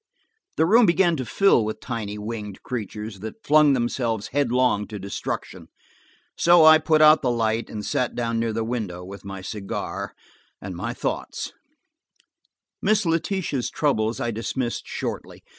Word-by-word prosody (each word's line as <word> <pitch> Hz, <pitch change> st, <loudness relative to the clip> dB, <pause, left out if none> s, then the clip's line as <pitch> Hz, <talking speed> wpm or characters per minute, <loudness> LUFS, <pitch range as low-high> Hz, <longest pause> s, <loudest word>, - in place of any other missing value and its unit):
The 160 Hz, -, +4 dB
room 225 Hz, +5 st, +5 dB
began 170 Hz, 0 st, +3 dB
to 130 Hz, -, -3 dB
fill 195 Hz, -, +4 dB
with 110 Hz, 0 st, -4 dB
tiny 110 Hz, -4 st, -5 dB
winged 105 Hz, -2 st, -6 dB
creatures 105 Hz, -3 st, -5 dB
that 110 Hz, +2 st, -9 dB
flung 150 Hz, -1 st, +5 dB
themselves 120 Hz, -3 st, -1 dB
headlong 125 Hz, -6 st, +1 dB
to 105 Hz, -, -7 dB
destruction, 100 Hz, 0 st, -5 dB, 0.7 s
so 170 Hz, -1 st, +6 dB
I 155 Hz, 0 st, +9 dB
put 155 Hz, 0 st, +3 dB
out 155 Hz, 0 st, +7 dB
the 130 Hz, -, +1 dB
light 115 Hz, -1 st, 0 dB
and 105 Hz, -1 st, -6 dB
sat 125 Hz, -, -1 dB
down 115 Hz, -1 st, -1 dB
near 115 Hz, 0 st, 0 dB
the 110 Hz, +1 st, -2 dB
window, 105 Hz, -7 st, -4 dB
with 100 Hz, +2 st, -10 dB
my 95 Hz, -1 st, -7 dB
cigar 100 Hz, 0 st, -5 dB, 0.4 s
and 95 Hz, -2 st, -7 dB
my 90 Hz, -, -4 dB
thoughts. -, -, -4 dB, 1.3 s
Miss 215 Hz, 0 st, +2 dB
Letitia's 165 Hz, -5 st, -1 dB
troubles 115 Hz, -7 st, 0 dB
I 120 Hz, -, -1 dB
dismissed 115 Hz, +2 st, -3 dB
shortly. -, -, -5 dB
115 Hz, 150 wpm, -24 LUFS, 105-150 Hz, 1.3 s, I